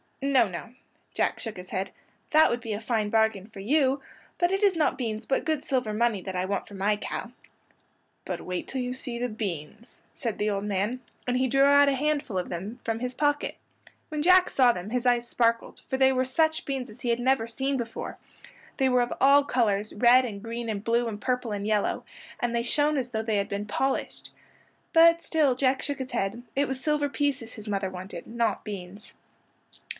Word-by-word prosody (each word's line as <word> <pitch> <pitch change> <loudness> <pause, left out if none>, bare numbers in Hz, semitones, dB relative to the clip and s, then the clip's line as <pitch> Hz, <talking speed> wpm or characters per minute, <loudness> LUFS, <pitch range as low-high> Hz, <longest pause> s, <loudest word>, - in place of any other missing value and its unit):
"No, 270 -5 +4
no," 190 +5 -7 0.4
Jack - - 0
shook 225 -5 -5
his 180 0 -9
head. 190 +1 -2 0.4
"That 310 0 +6
would 240 - -1
be 225 -2 -4
a 205 - -4
fine 220 -2 0
bargain 220 -3 +2
for 220 -3 -12
you; 270 +5 +2 0.4
but 350 0 +3
it 390 +1 0
is 395 -3 +4
not 305 -4 +1
beans 220 -3 -3
but 270 - 0
good 310 -3 0
silver 250 -5 -1
money 225 -2 +1
that 190 0 -6
I 180 0 0
want 200 +1 -2
for 210 - -13
my 200 +2 +1
cow." 230 +3 -5 0.9
"But - - -4
wait 180 -1 -4
till 265 - -3
you 250 0 -2
see 255 -2 -5
the 245 +1 -1
beans," 210 0 -6
said 230 -5 -4
the 210 - +1
old 200 -1 -1
man; 210 +5 -1 0.3
and 250 0 +1
he 260 +1 +2
drew 270 +2 +3
out 285 0 +6
a - - +2
handful 285 -5 -1
of 180 - -2
them 195 +8 -5
from 225 0 -2
his 250 +1 -4
pocket. 290 -1 0 0.5
When 305 -1 -2
Jack 365 +1 +6
saw 255 -3 +5
them 180 -2 -6
his 250 0 -1
eyes 240 -1 +2
sparkled, 230 -1 0
for 265 - -1
they 265 0 +5
were 260 0 +1
such 315 +4 +1
beans 265 -3 -3
as 215 - -16
he 245 - -2
had 235 0 +2
never 245 -2 +2
seen 270 +4 -1
before. 230 -2 -5 0.6
They 265 -1 +3
were 250 -1 +4
of 240 - -1
all 280 +1 +6
colors, 215 -6 0
red 245 +3 +6
and 205 -5 -5
green 230 +1 -5
and 205 -2 -3
blue 235 +1 +1
and 210 -2 -5
purple 250 -3 -1
and 205 -1 -3
yellow, 210 -1 0 0.3
and 240 -1 -1
they 235 - +1
shone 295 +4 +2
as 250 -2 -2
though 220 -2 -2
they 220 -2 0
had 200 - -1
been 200 +1 -3
polished. 265 +6 -2 0.6
But 335 +1 +6
still 300 -6 +2
Jack 260 +1 +1
shook 285 -1 -3
his 260 0 -5
head. 195 +5 -2
It 280 +1 +2
was 265 -1 -3
silver 295 0 0
pieces 280 -6 -2
his 215 0 -10
mother 195 -2 -1
wanted, 185 +1 -8
not 230 -2 -1
beans. 200 0 -8
240 Hz, 215 wpm, -27 LUFS, 210-270 Hz, 0.9 s, That